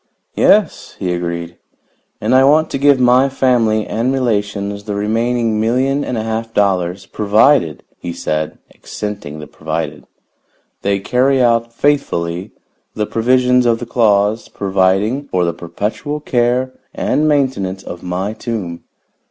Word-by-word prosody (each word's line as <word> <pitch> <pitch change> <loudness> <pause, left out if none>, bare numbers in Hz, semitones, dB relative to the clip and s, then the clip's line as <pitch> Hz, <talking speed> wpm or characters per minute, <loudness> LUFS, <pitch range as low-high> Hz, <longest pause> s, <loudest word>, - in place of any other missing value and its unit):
"Yes," - - +2
he 90 -1 -2
agreed. 85 -1 -4 0.6
"And 110 +4 0
I 130 +1 +6
want 155 +3 +4
to 135 - -2
give 140 -1 +4
my 125 +2 +4
family 120 -5 +2
and 115 +4 -1
relations 105 -5 -1
the 105 -2 -3
remaining 115 +1 0
million 130 +5 +1
and 125 - -3
a 110 - -2
half 115 0 -4
dollars, 95 -2 +1
provided," 105 - +2 0.2
he 85 - -5
said, 75 -2 -3 0.2
accenting 100 -8 -6
the 75 - -8
'provided,' 80 +2 -5 0.7
"they 100 0 +1
carry 130 +7 +1
out 115 -1 +2
faithfully 100 -10 -1 0.5
the 105 - -1
provisions 125 +2 +2
of 115 -1 +3
the 120 - -6
clause 110 -2 +2
providing 100 +7 +1
for 90 -6 0
the 85 - -1
perpetual 105 - -4
care 125 -1 0 0.2
and 155 +1 +1
maintenance 130 -11 0
of 85 - -8
my 95 +4 -3
tomb. 105 -8 -5
110 Hz, 135 wpm, -17 LUFS, 95-125 Hz, 0.7 s, I